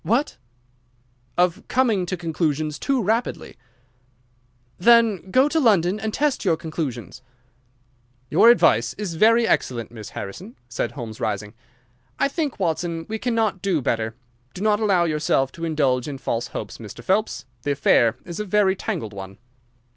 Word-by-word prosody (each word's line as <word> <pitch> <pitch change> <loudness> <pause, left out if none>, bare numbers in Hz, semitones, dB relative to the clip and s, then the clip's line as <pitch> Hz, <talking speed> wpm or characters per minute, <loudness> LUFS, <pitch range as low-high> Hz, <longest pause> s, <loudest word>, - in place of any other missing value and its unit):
"What!" 235 - 0 1.0
"Of 180 0 +2
coming 225 -8 +1
to 185 - -2
conclusions 155 -3 -2
too 270 -4 0
rapidly." 225 +5 -1 1.2
"Then 225 -2 +4
go 260 +7 +4
to 320 +2 +1
London 200 - +3
and 220 0 -3
test 290 +3 0
your 170 -6 +2
conclusions." 130 - -5 1.1
"Your 180 - +6
advice 120 - +4
is 200 -4 -4
very 225 +6 +4
excellent, 115 -3 0
Miss 110 -3 -9
Harrison," 180 - -7
said 120 - -3
Holmes, 115 -5 -7
rising. 105 0 -3 0.6
"I - - +2
think, 290 - -3
Watson, 165 -2 -1
we 220 0 -3
cannot 225 -6 0
do 190 -5 +1
better. 110 -3 -1 0.4
Do 185 - -5
not 210 -1 +3
allow 195 -5 +3
yourself 150 -4 +1
to 165 - -6
indulge 140 -6 +1
in 140 -2 -5
false 120 -2 -2
hopes, 105 - -7
Mr. 115 +2 -10
Phelps. 200 - 0 0.2
The 145 +3 0
affair 120 -4 +3
is 170 +1 -7
a - - -1
very 195 -1 +2
tangled 110 - -4
one." 95 0 -9
170 Hz, 150 wpm, -23 LUFS, -, 1.2 s, Your